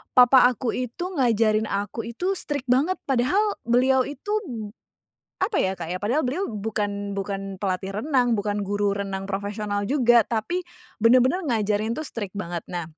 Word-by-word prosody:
papa 250 Hz, 0 st, +7 dB
aku 245 Hz, 0 st, -3 dB
itu 255 Hz, +10 st, -4 dB
ngajarin 220 Hz, -3 st, +3 dB
aku 200 Hz, +3 st, -3 dB
itu 370 Hz, +9 st, -1 dB
strict 285 Hz, -3 st, -4 dB
banget 275 Hz, +9 st, +3 dB
padahal 360 Hz, -, +1 dB
beliau 255 Hz, +2 st, +3 dB
itu, 290 Hz, +9 st, -6 dB, 1.1 s
apa 400 Hz, +1 st, +1 dB
ya 190 Hz, 0 st, +1 dB
Kak, 165 Hz, -, -4 dB
ya 185 Hz, -, -2 dB
padahal 245 Hz, +9 st, +1 dB
beliau 370 Hz, +9 st, -1 dB
bukan 205 Hz, -1 st, -3 dB
bukan 195 Hz, 0 st, -4 dB
pelatih 190 Hz, 0 st, -2 dB
renang, 250 Hz, -6 st, +2 dB
bukan 205 Hz, 0 st, -1 dB
guru 205 Hz, 0 st, 0 dB
renang 195 Hz, -1 st, -3 dB
profesional 205 Hz, +1 st, -2 dB
juga 240 Hz, -4 st, +5 dB
tapi 240 Hz, +11 st, -1 dB, 0.4 s
bener-bener 255 Hz, +9 st, +5 dB
ngajarin 215 Hz, -1 st, 0 dB
tuh 310 Hz, -, -4 dB
strict 205 Hz, -6 st, -6 dB
banget. 175 Hz, -4 st, -4 dB
Nah, 175 Hz, -2 st, -3 dB
225 Hz, 155 wpm, -24 LUFS, 200-260 Hz, 1.1 s, papa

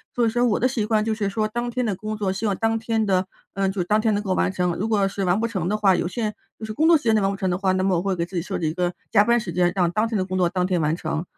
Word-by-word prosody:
所 240 Hz, -, +2 dB
以 -, -, +3 dB
说 240 Hz, +2 st, 0 dB
我 215 Hz, -, +1 dB
的 255 Hz, -, +3 dB
习 245 Hz, -4 st, -1 dB
惯 215 Hz, -1 st, +1 dB
就 225 Hz, -, 0 dB
是 210 Hz, -2 st, -1 dB
说 215 Hz, +2 st, -1 dB
当 240 Hz, +2 st, -3 dB
天 250 Hz, +1 st, -2 dB
的 210 Hz, -4 st, -1 dB
工 215 Hz, +3 st, -5 dB
作 195 Hz, -2 st, -1 dB
希 210 Hz, +3 st, -2 dB
望 200 Hz, -, -1 dB
当 225 Hz, 0 st, +1 dB
天 225 Hz, -1 st, 0 dB
的 185 Hz, -1 st, +1 dB, 0.3 s
嗯， 195 Hz, -1 st, 0 dB
就 190 Hz, -3 st, -2 dB
当 210 Hz, +4 st, +1 dB
天 220 Hz, 0 st, +2 dB
能 205 Hz, -, -2 dB
够 190 Hz, -3 st, 0 dB
完 -, -, +1 dB
成。 180 Hz, -2 st, 0 dB
如 215 Hz, +4 st, -1 dB
果 200 Hz, -3 st, +2 dB
是 195 Hz, 0 st, -3 dB
完 180 Hz, +3 st, +2 dB
不 230 Hz, -, 0 dB
成 190 Hz, -7 st, -3 dB
的 210 Hz, +3 st, 0 dB
话， 195 Hz, -3 st, +4 dB
有 175 Hz, -, -1 dB
些 215 Hz, +1 st, -3 dB, 0.3 s
就 220 Hz, -, -5 dB
是 215 Hz, -, -5 dB
工 310 Hz, +8 st, +2 dB
作 335 Hz, -1 st, +7 dB
时 290 Hz, -, -13 dB
间 225 Hz, -1 st, +3 dB
内 210 Hz, -, +3 dB
完 195 Hz, -, +2 dB
不 195 Hz, -, -3 dB
成 190 Hz, -1 st, -1 dB
的 180 Hz, -, 0 dB
话， 190 Hz, -1 st, +1 dB
那 185 Hz, 0 st, 0 dB
么 190 Hz, -2 st, +2 dB
我 170 Hz, -, 0 dB
会 195 Hz, -1 st, -1 dB
给 170 Hz, -, -1 dB
自 185 Hz, -, -11 dB
己 170 Hz, -, 0 dB
设 170 Hz, -, -4 dB
置 165 Hz, -, -3 dB
一 155 Hz, -, -1 dB
个 175 Hz, 0 st, -1 dB, 0.2 s
加 205 Hz, -, +5 dB
班 235 Hz, +2 st, +3 dB
时 185 Hz, -5 st, -5 dB
间， 175 Hz, 0 st, +2 dB
让 175 Hz, -3 st, +2 dB
当 215 Hz, +5 st, +1 dB
天 225 Hz, -, -2 dB
的 185 Hz, -, 0 dB
工 185 Hz, 0 st, -3 dB
作 175 Hz, -, +3 dB
当 180 Hz, 0 st, 0 dB
天 180 Hz, -2 st, 0 dB
完 155 Hz, +1 st, +1 dB
成。 160 Hz, -1 st, -3 dB
200 Hz, 395 characters per minute, -23 LUFS, 185-220 Hz, 0.3 s, 作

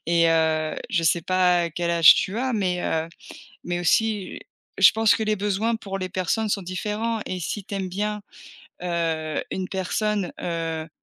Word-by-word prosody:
et 170 Hz, 0 st, +3 dB
heu, 160 Hz, -1 st, +1 dB, 0.2 s
je 170 Hz, -, +1 dB
sais 165 Hz, +1 st, +2 dB
pas 180 Hz, -1 st, +2 dB
quel 170 Hz, +2 st, -2 dB
âge 165 Hz, -2 st, +8 dB
tu 195 Hz, +4 st, -2 dB
as, 260 Hz, +1 st, -1 dB
mais, 185 Hz, -5 st, 0 dB
heu, 160 Hz, 0 st, -1 dB, 0.6 s
mais 175 Hz, 0 st, -2 dB
aussi, 205 Hz, +2 st, +1 dB, 0.4 s
je 195 Hz, -, +8 dB
pense 220 Hz, -1 st, +4 dB
que -, -, -2 dB
les 215 Hz, 0 st, 0 dB
besoins 210 Hz, +3 st, 0 dB
pour 195 Hz, -3 st, -6 dB
les 185 Hz, -1 st, -3 dB
personnes 190 Hz, +4 st, -1 dB
sont 200 Hz, -, -1 dB
différents 210 Hz, +5 st, -3 dB
et 185 Hz, -, -4 dB
si 195 Hz, +4 st, -4 dB
tu 200 Hz, -, -7 dB
aimes 190 Hz, -1 st, -3 dB
bien, 210 Hz, +3 st, -3 dB, 0.6 s
heu, 165 Hz, -3 st, -2 dB
une 185 Hz, -1 st, -3 dB
personne, 195 Hz, 0 st, -1 dB
heu, 165 Hz, -2 st, -3 dB
185 Hz, 175 wpm, -24 LUFS, 170-210 Hz, 0.6 s, âge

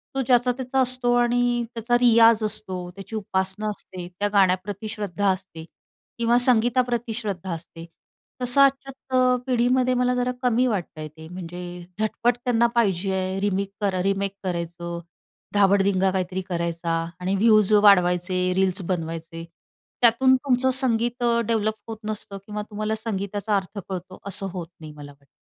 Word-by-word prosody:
तो 270 Hz, -, +1 dB
ज्याचा-त्याचा 250 Hz, +1 st, +1 dB
असतो, 250 Hz, -1 st, +1 dB
आणि 240 Hz, 0 st, +2 dB
त्याचा 240 Hz, +2 st, +1 dB
रियाज 230 Hz, -2 st, +5 dB
असतो, 190 Hz, -4 st, -2 dB
त्याची 195 Hz, +3 st, -8 dB
उपासना 190 Hz, +1 st, -2 dB
असते. 185 Hz, -3 st, -7 dB
त्या 205 Hz, 0 st, +1 dB
गाण्याप्रती 195 Hz, +2 st, +1 dB
श्रद्धा 205 Hz, -2 st, -1 dB
असते 185 Hz, -4 st, -4 dB, 0.5 s
किंवा 235 Hz, +1 st, +3 dB
संगीताप्रती 240 Hz, -1 st, +1 dB
श्रद्धा 195 Hz, -5 st, -4 dB
असते, 165 Hz, 0 st, -9 dB, 0.6 s
तसं 250 Hz, +3 st, +3 dB
आजच्या 265 Hz, -2 st, +2 dB
पिढीमध्ये 255 Hz, +1 st, +2 dB
मला 250 Hz, 0 st, +1 dB
जरा 250 Hz, 0 st, 0 dB
कमी 250 Hz, +1 st, +3 dB
वाटतंय 170 Hz, -7 st, -3 dB
ते, 160 Hz, +1 st, -13 dB
म्हणजे 180 Hz, 0 st, -8 dB, 0.4 s
झटपट 235 Hz, +2 st, +1 dB
त्यांना 235 Hz, -1 st, +3 dB
पाहिजे 195 Hz, -4 st, +1 dB
आहे, 190 Hz, 0 st, -2 dB
रिमिक 200 Hz, -1 st, 0 dB
कर 195 Hz, -2 st, 0 dB
रिमेक 195 Hz, 0 st, -1 dB
करायचं, 170 Hz, -1 st, -4 dB, 0.5 s
धाबडदिंगा 195 Hz, -1 st, +3 dB
काहीतरी 185 Hz, 0 st, -2 dB
करायचा, 170 Hz, -1 st, -2 dB, 0.3 s
आणि 185 Hz, +2 st, -1 dB
व्यूज 215 Hz, 0 st, +4 dB
वाढवायचे, 185 Hz, -2 st, +4 dB
रील्स 190 Hz, 0 st, +1 dB
बनवायचे. 165 Hz, -1 st, -4 dB, 0.6 s
त्यातून 260 Hz, +3 st, +5 dB
तुमचं 260 Hz, -1 st, +1 dB
संगीत 240 Hz, -2 st, 0 dB, 0.2 s
डेव्हलप 215 Hz, -1 st, +1 dB
होत 225 Hz, -1 st, -6 dB
नसतं 205 Hz, -2 st, -6 dB
किंवा 210 Hz, 0 st, -5 dB
तुम्हाला 215 Hz, +1 st, -2 dB
संगीताचा 205 Hz, -1 st, -2 dB
अर्थ 200 Hz, +1 st, -3 dB
कळतो 185 Hz, 0 st, -6 dB
असं 195 Hz, 0 st, -3 dB
होत 175 Hz, -3 st, -5 dB
नाही 155 Hz, -1 st, -9 dB
मला 145 Hz, -1 st, -11 dB
वाटतं. 140 Hz, -1 st, -24 dB
205 Hz, 140 wpm, -24 LUFS, 185-240 Hz, 0.6 s, रियाज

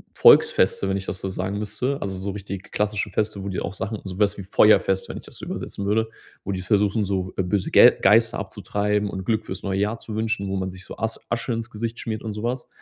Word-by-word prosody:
Volksfeste, 95 Hz, -, +5 dB
wenn 95 Hz, -, +1 dB
ich 95 Hz, -, -5 dB
das 95 Hz, -, -3 dB
so 95 Hz, -, -4 dB
sagen 95 Hz, +2 st, -3 dB
müsste. 105 Hz, +7 st, -2 dB
Also 95 Hz, -1 st, -3 dB
so 100 Hz, +1 st, -3 dB
richtig 100 Hz, -1 st, -7 dB
klassische 105 Hz, 0 st, -1 dB
Feste, 105 Hz, -2 st, -2 dB
wo 100 Hz, -, -4 dB
die 95 Hz, -, -2 dB
auch 85 Hz, -, -4 dB
Sachen 105 Hz, +1 st, -4 dB
sowas 100 Hz, +2 st, 0 dB
wie 100 Hz, -, -6 dB
Feuerfest, 95 Hz, 0 st, +4 dB
wenn -, -, -5 dB
ich -, -, -9 dB
das -, -, -9 dB
so -, -, -8 dB
übersetzen 100 Hz, -, -5 dB
würde, 110 Hz, +2 st, +1 dB, 0.4 s
wo 100 Hz, -, -2 dB
die 95 Hz, -, -3 dB
versuchen, 105 Hz, +3 st, +2 dB
so, 95 Hz, -1 st, -2 dB
äh, 95 Hz, -, +1 dB
böse 90 Hz, +1 st, -1 dB
Ge -, -, +8 dB
Geister 115 Hz, +4 st, +4 dB
abzutreiben 105 Hz, +1 st, -1 dB
und 95 Hz, -1 st, -5 dB
Glück 110 Hz, 0 st, 0 dB
fürs 95 Hz, -1 st, -6 dB
neue 95 Hz, -1 st, -1 dB
Jahr 105 Hz, +3 st, 0 dB
zu 110 Hz, -1 st, -8 dB
wünschen, 110 Hz, -2 st, -1 dB
wo 95 Hz, -, -1 dB
man 95 Hz, -1 st, -2 dB
sich 95 Hz, +1 st, -11 dB
so -, -, -9 dB
As 110 Hz, 0 st, -3 dB
Asche 120 Hz, +1 st, -2 dB
ins 115 Hz, 0 st, -4 dB
Gesicht 115 Hz, +1 st, -4 dB
schmiert 110 Hz, -1 st, -4 dB
und 110 Hz, -, -3 dB
sowas. 120 Hz, +4 st, -3 dB
105 Hz, 245 wpm, -24 LUFS, 95-110 Hz, 0.4 s, Ge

